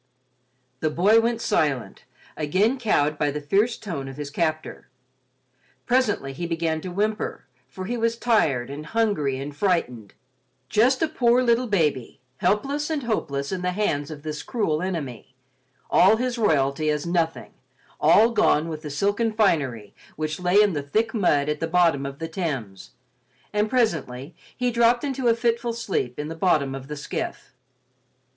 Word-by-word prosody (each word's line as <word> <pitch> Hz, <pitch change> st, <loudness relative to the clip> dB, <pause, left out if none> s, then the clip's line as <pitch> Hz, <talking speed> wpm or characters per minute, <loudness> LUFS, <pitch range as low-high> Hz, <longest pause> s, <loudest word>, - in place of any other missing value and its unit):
The 155 Hz, -, 0 dB
boy 200 Hz, +8 st, +4 dB
went 230 Hz, 0 st, 0 dB
silent, 140 Hz, -, -1 dB, 0.3 s
again 195 Hz, -, +1 dB
cowed 150 Hz, -, +1 dB
by 150 Hz, -, +2 dB
the 150 Hz, +1 st, -3 dB
fierce 200 Hz, +11 st, +1 dB
tone 160 Hz, -10 st, -5 dB
of 135 Hz, 0 st, -9 dB
his 145 Hz, -1 st, -6 dB
captor. 155 Hz, -3 st, -3 dB, 1.0 s
Presently 220 Hz, -, +1 dB
he 170 Hz, +5 st, -4 dB
began 165 Hz, -1 st, -1 dB
to 185 Hz, -, -6 dB
whimper, 210 Hz, +4 st, -2 dB, 0.2 s
for 185 Hz, +8 st, -8 dB
he 240 Hz, +5 st, -2 dB
was 230 Hz, 0 st, 0 dB
tired 150 Hz, -, +1 dB
and 145 Hz, +2 st, -6 dB
hungry 200 Hz, -13 st, 0 dB
and 140 Hz, +2 st, -6 dB
frightened—just 130 Hz, -, -1 dB
a -, -, +3 dB
poor 250 Hz, -5 st, +2 dB
little 240 Hz, +1 st, +2 dB
baby, 155 Hz, -, 0 dB, 0.2 s
helpless 275 Hz, -, 0 dB
and 305 Hz, -4 st, -2 dB
hopeless 140 Hz, -12 st, -2 dB
in 185 Hz, -1 st, -3 dB
the 180 Hz, 0 st, -1 dB
hands 145 Hz, -8 st, -1 dB
of 150 Hz, -2 st, -9 dB
this 150 Hz, -1 st, -4 dB
cruel 165 Hz, -10 st, -1 dB
enemy—all 130 Hz, -, -1 dB
his 250 Hz, +1 st, -1 dB
royalty 155 Hz, -6 st, +1 dB
as 150 Hz, +1 st, -1 dB
nothing, 170 Hz, -1 st, -1 dB, 0.5 s
all 210 Hz, +9 st, +5 dB
gone 185 Hz, -8 st, +2 dB
with 155 Hz, -1 st, -5 dB
the 155 Hz, -, -6 dB
silken 205 Hz, +9 st, 0 dB
finery 140 Hz, -, 0 dB, 0.2 s
which 155 Hz, +1 st, -3 dB
lay 180 Hz, +3 st, +4 dB
in 205 Hz, -3 st, +1 dB
the 145 Hz, -, -2 dB
thick 220 Hz, +11 st, -1 dB
mud 150 Hz, -10 st, +2 dB
at 150 Hz, 0 st, -1 dB
the 165 Hz, -, -1 dB
bottom 165 Hz, -5 st, +2 dB
of 140 Hz, 0 st, -8 dB
the 165 Hz, -, -4 dB
Thames, 140 Hz, -, -5 dB, 0.6 s
and 210 Hz, +1 st, +1 dB
presently 160 Hz, -, -1 dB, 0.2 s
he 250 Hz, 0 st, 0 dB
dropped 235 Hz, +1 st, +3 dB
into 270 Hz, -3 st, -1 dB
a 230 Hz, -, +4 dB
fitful 235 Hz, 0 st, 0 dB
sleep 195 Hz, -, -3 dB
in 150 Hz, -, -4 dB
the 160 Hz, -, -5 dB
bottom 160 Hz, -5 st, +1 dB
of 135 Hz, 0 st, -7 dB
the 150 Hz, 0 st, -6 dB
skiff. 145 Hz, -, -5 dB
165 Hz, 160 wpm, -24 LUFS, 145-220 Hz, 1.0 s, all